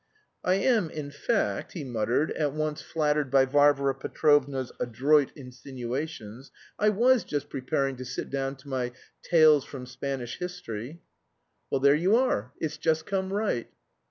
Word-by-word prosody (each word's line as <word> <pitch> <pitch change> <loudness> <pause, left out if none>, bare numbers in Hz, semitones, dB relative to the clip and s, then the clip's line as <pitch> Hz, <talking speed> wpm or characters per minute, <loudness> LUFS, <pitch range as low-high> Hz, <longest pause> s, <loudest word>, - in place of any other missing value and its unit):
"I 185 - +3
am, 215 -4 +2
in 150 -2 -6
fact," 205 +9 -1
he 165 - -5
muttered, 120 +3 0
at 145 -3 -1
once 155 0 -2
flattered 150 -3 0
by 135 0 +5
Varvara 140 0 +3
Petrovna's 135 -1 +1
adroit 135 +5 +2
insinuations. 125 -1 -6 0.3
"I 210 - +4
was 240 +4 +4
just 145 -1 -4
preparing 135 0 -1
to 130 - -6
sit 125 +1 -5
down 135 0 -2
to 135 +1 -18
my 125 -2 -2 0.3
'Tales 155 -4 +5
from 130 -3 -8
Spanish 130 -1 -5
History.'" 165 -5 -6 0.7
"Well, 135 - 0
there 140 +1 +6
you 180 +8 +3
are. 125 - +1
It's 155 -1 -3
just 160 -1 +1
come 190 -1 -2
right." 205 - -1
145 Hz, 150 wpm, -27 LUFS, 130-160 Hz, 0.7 s, there